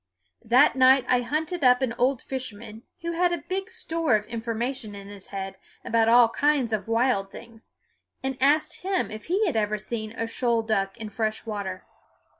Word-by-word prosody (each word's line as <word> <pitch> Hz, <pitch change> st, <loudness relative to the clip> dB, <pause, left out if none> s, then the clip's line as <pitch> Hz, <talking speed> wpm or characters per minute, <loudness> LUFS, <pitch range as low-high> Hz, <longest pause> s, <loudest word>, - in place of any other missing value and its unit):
That 255 Hz, +6 st, +5 dB
night 260 Hz, 0 st, +5 dB
I 250 Hz, -1 st, +3 dB
hunted 310 Hz, +6 st, -2 dB
up 250 Hz, 0 st, +5 dB
an 240 Hz, -3 st, 0 dB
old 255 Hz, +1 st, +1 dB
fisherman, 225 Hz, -4 st, -6 dB, 0.2 s
who 335 Hz, -, -2 dB
had 350 Hz, +1 st, +2 dB
a 345 Hz, -, 0 dB
big 380 Hz, +1 st, -3 dB
store 325 Hz, -7 st, 0 dB
of 210 Hz, 0 st, -1 dB
information 230 Hz, 0 st, -4 dB
in 200 Hz, 0 st, -10 dB
his 200 Hz, -2 st, -10 dB
head 195 Hz, -1 st, -6 dB, 0.3 s
about 225 Hz, 0 st, +2 dB
all 235 Hz, 0 st, +7 dB
kinds 280 Hz, -3 st, +1 dB
of 215 Hz, +1 st, -2 dB
wild 230 Hz, -4 st, +1 dB
things, 225 Hz, -1 st, -13 dB, 0.5 s
and 265 Hz, 0 st, -2 dB
asked 295 Hz, +3 st, +2 dB
him 380 Hz, 0 st, -1 dB
if 215 Hz, 0 st, -8 dB
he 390 Hz, +6 st, +1 dB
had 330 Hz, -, -1 dB
ever 215 Hz, -1 st, +1 dB
seen 215 Hz, 0 st, -5 dB
a 230 Hz, -, -3 dB
shoal 230 Hz, 0 st, 0 dB
duck 195 Hz, -3 st, -1 dB
in 220 Hz, -2 st, -6 dB
fresh 215 Hz, +1 st, -2 dB
water. 200 Hz, -4 st, -5 dB
235 Hz, 185 wpm, -26 LUFS, 215-270 Hz, 0.5 s, all